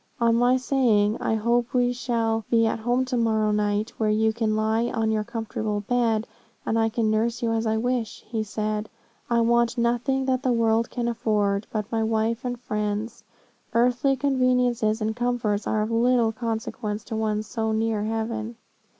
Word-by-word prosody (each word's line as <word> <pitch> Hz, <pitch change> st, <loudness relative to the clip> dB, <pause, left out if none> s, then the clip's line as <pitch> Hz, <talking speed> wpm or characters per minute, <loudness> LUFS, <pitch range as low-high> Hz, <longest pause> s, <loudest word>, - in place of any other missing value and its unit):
On 230 Hz, -1 st, +3 dB
my 245 Hz, +2 st, +4 dB
saying, 235 Hz, -5 st, +2 dB
'I 220 Hz, -, +1 dB
hope 235 Hz, +3 st, 0 dB
we 245 Hz, 0 st, +3 dB
shall 230 Hz, -2 st, -1 dB
be 230 Hz, -1 st, +4 dB
at 225 Hz, -, 0 dB
home 245 Hz, +3 st, +1 dB
to 255 Hz, -1 st, -2 dB
morrow 220 Hz, -2 st, +2 dB
night, 210 Hz, +1 st, 0 dB
where 220 Hz, -1 st, +1 dB
you 220 Hz, +1 st, +2 dB
can 220 Hz, -1 st, 0 dB
lie 220 Hz, +2 st, +1 dB
on 225 Hz, -2 st, 0 dB
your 215 Hz, -1 st, 0 dB
comfortable 220 Hz, -2 st, -3 dB
bed, 225 Hz, 0 st, +1 dB, 0.4 s
and 225 Hz, -, +1 dB
I 225 Hz, 0 st, +2 dB
can 220 Hz, -1 st, 0 dB
nurse 230 Hz, +2 st, 0 dB
you 230 Hz, -, +1 dB
as 225 Hz, 0 st, 0 dB
I 220 Hz, 0 st, +1 dB
wish,' 240 Hz, -1 st, -2 dB
he 225 Hz, -1 st, -2 dB
said, 215 Hz, 0 st, -3 dB, 0.4 s
'I 235 Hz, -1 st, +3 dB
want 235 Hz, +1 st, +2 dB
nothing 245 Hz, +3 st, +1 dB
that 260 Hz, -1 st, +1 dB
the 260 Hz, -2 st, +1 dB
world 230 Hz, 0 st, +2 dB
can 240 Hz, -1 st, -2 dB
afford, 210 Hz, -3 st, 0 dB
but 210 Hz, -1 st, -3 dB
my 225 Hz, -1 st, 0 dB
wife 225 Hz, +2 st, 0 dB
and 245 Hz, -1 st, -3 dB
friends; 210 Hz, -1 st, -3 dB, 0.5 s
earthly 250 Hz, +3 st, +3 dB
conveniences 250 Hz, -5 st, +1 dB
and 220 Hz, +1 st, -1 dB
comforts 240 Hz, -4 st, -1 dB
are 215 Hz, -1 st, +1 dB
of 215 Hz, -, -3 dB
little 235 Hz, 0 st, +3 dB
consequence 220 Hz, -2 st, -4 dB
to 225 Hz, -, -6 dB
one 215 Hz, -1 st, -1 dB
so 220 Hz, 0 st, -2 dB
near 220 Hz, -1 st, 0 dB
heaven. 225 Hz, +1 st, -3 dB
225 Hz, 180 wpm, -25 LUFS, 215-240 Hz, 0.5 s, my